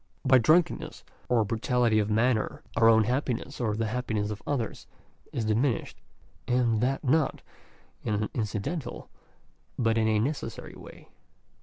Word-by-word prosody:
By 130 -1 +6
drunken 155 +9 +3
ness, - - -9 0.3
or 120 -3 +3
by 100 - -7
brutality 115 -1 +2
of 105 0 0
manner, 110 +1 +1
our 115 0 +5
own 110 -1 +6
happiness, 125 +2 -2
or 110 -3 0
the 115 +1 -1
hap 125 +3 -3
piness 105 -1 -1
of 105 - -6
others, 130 -6 -3 0.4
is 115 - -2
diminished; 115 +3 0 0.5
and 120 -3 +2
that 135 +4 0
not 145 +2 +1 0.6
in 105 - 0
an 105 +1 -1
incidental 115 - -4 0.7
but 115 -1 +2
in 110 - +2
a 110 -1 +2
necessary 120 0 -3
way. - - -13
115 Hz, 155 wpm, -28 LUFS, 110-130 Hz, 0.7 s, By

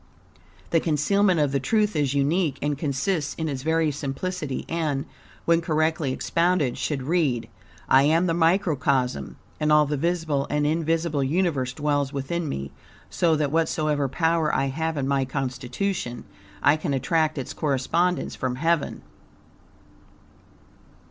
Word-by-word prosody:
The 165 - +4
concealment 175 +4 +2
of 145 -2 +2
the 140 - +1
truth 210 - +1
is 145 -2 +1
unique, 145 +1 +1
and 145 0 -1
consists 150 +3 -1
in 160 - -3
its 135 -3 -3
very 160 +1 +1
simplicity; 145 +2 -4
and, 155 -4 -1 0.4
when 170 0 +3
correctly 155 -3 0
expounded, 170 -2 +1
should 140 -4 -2
read: 145 -6 0 0.4
"I 130 - +6
am 165 +4 +3
the 170 - +1
microcosm, 145 - +1 0.2
and 150 0 +1
all 150 0 +6
the 145 0 -2
visible 160 -3 0
and 150 0 +1
invisible 160 -1 0
universe 145 -4 0
dwells 145 0 -1
within 150 +4 -3
me, 70 - -4 0.4
so 165 - +2
that 150 -2 0
whatsoever 155 -3 +1
power 160 +1 +1
I 135 0 +1
have 160 +3 -2
in 135 -1 -1
my 140 -1 +2
constitution, 130 +2 -3 0.4
I 145 +2 +5
can 155 -3 -2
attract 155 +3 +1
its 135 - -4
correspondence 160 +5 0
from 130 -1 -2
Heaven." 165 +3 0
150 Hz, 140 wpm, -25 LUFS, 135-165 Hz, 0.4 s, I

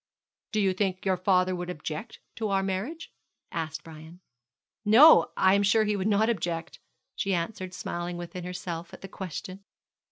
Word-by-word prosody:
'Do 215 - 0
you 195 -2 +2
think 185 -1 -2
your 190 -1 +3
father 185 0 +2
would 175 0 -5
object 155 +3 -6 0.2
to 220 - -2
our 195 -1 +1
marriage?' 200 - -4 0.4
asked 160 0 -4
Brian. 160 +2 -12 0.6
'No, 235 +10 +8
I 190 0 +5
am 200 - +4
sure 210 +2 +4
he 210 -1 0
would 195 0 -1
not 215 +1 +3
object,' 175 -7 -2 0.4
she 195 0 0
answered, 185 +1 -4
smiling 175 0 -4
within 175 +1 -7
herself 175 -1 -6
at - - -17
the 195 - -7
question. 190 +1 -7
185 Hz, 165 wpm, -28 LUFS, 175-200 Hz, 0.6 s, No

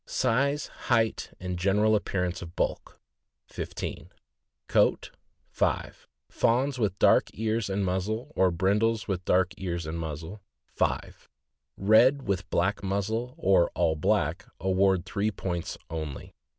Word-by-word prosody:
Value. - - -15
Size, 140 +4 +1 0.2
height, 115 -2 +1
and 90 -1 -4
general 105 +4 +3
appearance 90 -4 -1
of 85 0 -9
bulk - - -2 0.5
15 - - -6 0.6
Coat - - +2 0.4
5 - - -2 0.2
Fawns 130 +3 +1
with 100 -4 0
dark - - +4
ears 110 -1 -1
and 95 0 0
muzzle, 110 +10 -2
or 95 - +4
brindles 105 +6 +1
with 95 -3 -2
dark 90 0 +2
ears 85 -3 -3
and 80 +2 -4
muzzle.. 80 +5 -6 0.3
5 - - -2 0.5
Red 120 +7 +5
with 95 -2 -1
black 95 +4 +1
muzzle, 110 +6 -2
or 95 -2 +3
all 80 -2 +2
black, 80 +3 0
award 95 -1 +2
three 100 +3 -1
points 90 -4 -4
only. 80 -4 -6
95 Hz, 130 wpm, -28 LUFS, 90-110 Hz, 0.6 s, Red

